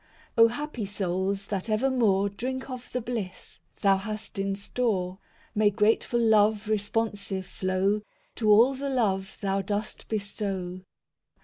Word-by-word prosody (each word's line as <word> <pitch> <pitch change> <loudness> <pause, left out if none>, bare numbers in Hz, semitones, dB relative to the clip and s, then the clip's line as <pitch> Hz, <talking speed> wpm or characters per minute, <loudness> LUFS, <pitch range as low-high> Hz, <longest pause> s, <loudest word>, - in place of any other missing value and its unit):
V 230 - +4
O 230 - +10
happy 250 0 -4
souls 195 0 -1
that 200 +1 -3
evermore 215 -4 +3
Drink 260 +6 -4
of 250 -1 -7
the 250 - -1
bliss 225 -6 -5 0.2
Thou 195 -2 +5
hast 210 +1 -6
in 195 0 0
store; 200 -3 -1 0.3
May 215 -1 +4
grateful 220 +3 +2
love 215 -2 +4
responsive 205 -2 -1
flow 190 +2 0 0.4
To 220 -2 +1
all 230 +6 +7
the 275 +1 -3
love 200 -6 0
Thou 195 -1 +1
dost 210 +1 -4
bestow. 195 -3 -3
210 Hz, 135 wpm, -27 LUFS, 195-230 Hz, 0.4 s, O